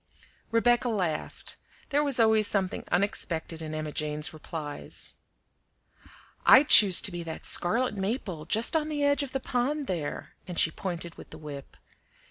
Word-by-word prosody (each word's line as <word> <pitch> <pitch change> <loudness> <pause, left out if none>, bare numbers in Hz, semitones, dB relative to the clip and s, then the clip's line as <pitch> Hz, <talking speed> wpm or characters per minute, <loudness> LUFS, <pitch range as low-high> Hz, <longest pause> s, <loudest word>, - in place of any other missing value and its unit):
Rebecca 240 +2 +2
laughed. 180 -8 -4 0.3
There 290 +1 +1
was 280 -4 +3
always 220 -2 +4
something 190 -3 -2
unexpected 170 -4 -1
in 155 -1 -6
Emma 155 -1 -4
Jane's 150 +1 -2
replies. 155 -1 -6 1.3
"I'd 265 +2 +6
choose 195 -4 +9
to 205 - +1
be 175 0 -6
that 165 -1 -8
scarlet 225 +6 +1
maple 195 - -4
just 225 +8 +1
on 310 -1 0
the 295 -2 -2
edge 285 0 +2
of 280 -2 -5
the 270 - -2
pond 270 +4 -2
there," 170 - -5
and 180 -2 -7
she 160 - +3
pointed 170 -1 -6
with - - -12
the 155 - -11
whip. 145 -3 -10
195 Hz, 155 wpm, -27 LUFS, 160-245 Hz, 1.3 s, choose